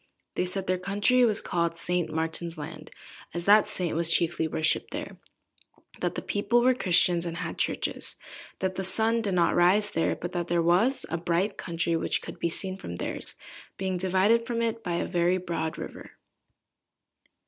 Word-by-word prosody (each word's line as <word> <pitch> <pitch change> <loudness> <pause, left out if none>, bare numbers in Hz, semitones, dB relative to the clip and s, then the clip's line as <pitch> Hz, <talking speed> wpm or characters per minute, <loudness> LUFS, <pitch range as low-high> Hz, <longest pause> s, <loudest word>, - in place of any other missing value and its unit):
They - - 0
said 190 +1 -4
their 185 0 0
country 205 +7 +3
was 215 -2 +3
called 170 -1 -1
St. 175 -1 -1
Martin's 160 +1 -2
Land, 150 +1 -8 0.5
as 170 0 -3
that 210 +1 +6
saint 175 -4 -2
was 165 0 +3
chiefly 165 -1 +2
worshipped 160 0 0
there; - - -6 0.8
that - - -1
the - - -4
people 220 +4 +1
were 255 +1 +5
Christians, 180 -6 +2
and 170 -1 -4
had 175 -2 -5
churches; - - -1 0.5
that 190 0 0
the 190 - -3
sun 225 +4 +1
did 200 -4 -1
not 170 -1 +3
rise 195 +4 +4
there, 165 - +1
but 175 - -6
that 175 -1 -2
there 170 -1 +1
was 190 +11 +2
a 165 - 0
bright 175 +4 0
country 170 0 -2
which 165 - 0
could - - -8
be 170 - 0
seen 190 +3 -2
from 85 - -7
theirs, - - -1 0.4
being 190 -1 -1
divided 190 +6 +2
from 235 -1 -1
it 230 0 -2
by 175 -2 -2
a 170 - -1
very 175 +1 +1
broad 170 -3 -3
river. - - -8
180 Hz, 180 wpm, -27 LUFS, 170-205 Hz, 0.8 s, that